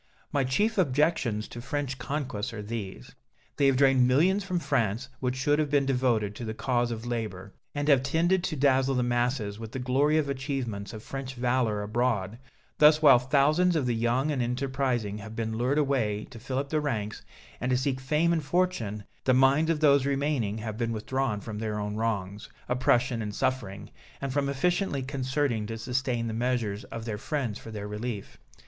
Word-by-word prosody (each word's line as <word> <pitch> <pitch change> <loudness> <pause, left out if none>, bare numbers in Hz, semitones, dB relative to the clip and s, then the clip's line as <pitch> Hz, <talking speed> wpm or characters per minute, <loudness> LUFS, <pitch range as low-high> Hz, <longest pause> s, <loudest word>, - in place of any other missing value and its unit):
My 140 - +2
chief 205 - +1
objections 135 - +1
to 120 - -8
French 140 0 -3
conquests 125 -4 -3
are 105 -2 -6
these 105 - -6 0.4
they 140 - +4
have 135 -1 +3
drained 135 -2 +5
millions 180 +10 +3
from 185 -2 -2
France 125 - 0
which 125 -1 -1
should 145 +3 +2
have 150 -2 +1
been 140 -1 +3
devoted 125 -6 +1
to - - -6
the 110 -1 -4
cause 120 0 0
of 115 0 -5
labor, 105 -5 -4 0.2
and 145 0 -1
have 140 -4 +5
tended 170 +7 +1
to 155 - -2
dazzle 135 -1 +3
the 125 - +2
masses 120 -3 0
with 110 -1 -8
the - - -3
glory 135 +4 +2
of 155 - +2
the 140 - -2
achievements 130 -7 -3
of 110 -1 -9
French 135 -1 -6
valor 120 -4 0
abroad; 110 -1 -1 0.4
thus 150 +1 +6
while 135 -5 +8
thousands 150 +7 +3
of 150 -5 +1
the 120 - +1
young 120 +6 +1
and 135 -4 -1
enterprising 125 -4 -1
have 110 +2 -9
been 110 -1 -2
lured 125 +5 +1
away 125 -8 +1
to 120 - -10
fill 130 +3 -4
up 140 +1 -2
the 155 0 +1
ranks, 110 -8 -3 0.4
and 125 - -2
to 125 - +3
seek 130 0 -1
fame 150 +6 +2
and 160 -2 0
fortune, 135 - -1 0.2
the 130 - +4
minds 135 +5 +4
of 160 -2 +1
those 140 -2 +5
remaining 135 -7 0
have 110 0 -5
been 115 -1 0
withdrawn 120 0 -1
from 105 0 -6
their 110 -1 -2
own 105 0 -3
wrongs, 105 -3 -2 0.2
oppression 125 -1 +2
and 105 -1 -4
suffering, 110 -7 -2 0.3
and 135 -2 -3
from 140 -1 +1
efficiently 170 0 0
concerting 130 -4 -1
to 115 0 -5
sustain 125 0 -1
the 115 - -3
measures 115 -3 -1
of 115 -1 -7
their 105 -3 -4
friends 130 -6 -2
for - - -10
their 105 -2 -5
relief. 105 0 -5
125 Hz, 195 wpm, -28 LUFS, 110-140 Hz, 0.4 s, while